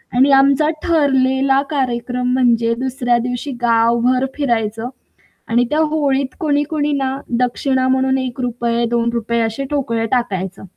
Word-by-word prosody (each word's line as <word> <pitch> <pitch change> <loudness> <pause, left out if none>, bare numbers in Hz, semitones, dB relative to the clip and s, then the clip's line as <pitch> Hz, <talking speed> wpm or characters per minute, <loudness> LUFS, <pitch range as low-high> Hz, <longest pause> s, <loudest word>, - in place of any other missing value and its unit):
आणि 270 +3 +4
आमचा 275 +2 +4
ठरलेला 270 -3 +2
कार्यक्रम 250 -3 -2
म्हणजे 235 -2 +2
दुसऱ्या 250 -2 0
दिवशी 245 +4 -4
गावभर 235 +2 +2
फिरायचं 230 -4 -1 0.6
आणि 240 +2 +2
त्या 300 - 0
होळीत 285 -4 0
कोणी-कोणी 295 -1 0
ना 270 -1 -1 0.2
दक्षिणा 255 +1 0
म्हणून 265 0 +1
₹1, 240 -2 -2
₹2 235 0 -1
असे 225 +5 -2
ठोकळे 230 -6 -1
टाकायचं. 195 -7 -2
255 Hz, 115 wpm, -18 LUFS, 235-275 Hz, 0.6 s, आणि